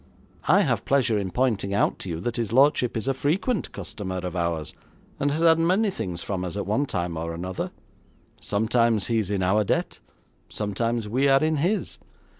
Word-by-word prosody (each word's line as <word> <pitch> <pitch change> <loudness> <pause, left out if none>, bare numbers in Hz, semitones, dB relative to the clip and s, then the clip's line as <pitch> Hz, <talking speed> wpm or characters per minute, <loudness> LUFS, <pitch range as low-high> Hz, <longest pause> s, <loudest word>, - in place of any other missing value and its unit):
I 190 +6 +6
have 115 - 0
pleasure 130 -6 +2
in 95 -2 -3
pointing 100 -2 0
out - - +1
to 95 - -6
you 80 -1 -3
that 120 +4 -3
his 115 -3 -2
lordship 130 -2 +3
is 110 - -4
a 135 - +2
frequent 180 - -1
customer 95 -3 -5
of 90 -1 -4
ours, 85 -3 -2 0.5
and 145 - +1
has 150 +3 -1
had 165 -1 +5
many 190 +6 +2
things 90 - -5
from 95 -2 -3
us 90 +2 -4
at 100 - -2
one 120 +8 0
time 85 -5 -2
or 85 +1 -4
another. 90 +2 -4 0.7
Sometimes 110 0 +1
he 115 -1 +1
is 100 -3 -2
in 100 -2 0
our 100 +4 +3
debt; - - -1 0.5
sometimes 115 +2 -2
we 130 +6 +2
are 135 +1 +4
in 155 0 +1
his. 180 +9 -1
110 Hz, 195 wpm, -25 LUFS, 95-140 Hz, 0.7 s, I